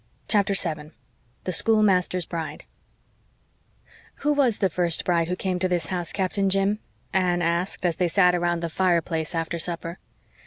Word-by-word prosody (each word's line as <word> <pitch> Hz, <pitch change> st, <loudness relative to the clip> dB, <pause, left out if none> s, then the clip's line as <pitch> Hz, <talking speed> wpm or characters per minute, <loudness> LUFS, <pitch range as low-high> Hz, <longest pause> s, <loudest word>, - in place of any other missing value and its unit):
CHAPTER 200 Hz, -2 st, +2 dB
7 155 Hz, -4 st, -3 dB, 0.5 s
THE 185 Hz, -, -2 dB
SCHOOLMASTER'S 185 Hz, -3 st, +3 dB
BRIDE 165 Hz, -2 st, -5 dB, 1.6 s
"Who 295 Hz, +1 st, +2 dB
was 265 Hz, -7 st, +2 dB
the 190 Hz, -3 st, +1 dB
first 170 Hz, -1 st, +1 dB
bride 170 Hz, -2 st, +2 dB
who 180 Hz, -, -1 dB
came 185 Hz, -1 st, -2 dB
to 185 Hz, -, +2 dB
this 175 Hz, -3 st, -1 dB
house, 175 Hz, -2 st, -2 dB
Captain 195 Hz, 0 st, 0 dB
Jim?" 195 Hz, +2 st, +1 dB, 0.3 s
Anne 180 Hz, -2 st, +2 dB
asked, 170 Hz, +3 st, -1 dB
as 170 Hz, -2 st, +1 dB
they 180 Hz, -, +2 dB
sat 180 Hz, +1 st, +4 dB
around 175 Hz, -1 st, 0 dB
the 170 Hz, -, -2 dB
fireplace 170 Hz, -3 st, 0 dB
after 165 Hz, +1 st, -2 dB
supper. 170 Hz, +1 st, -3 dB
180 Hz, 155 wpm, -25 LUFS, 170-190 Hz, 1.6 s, sat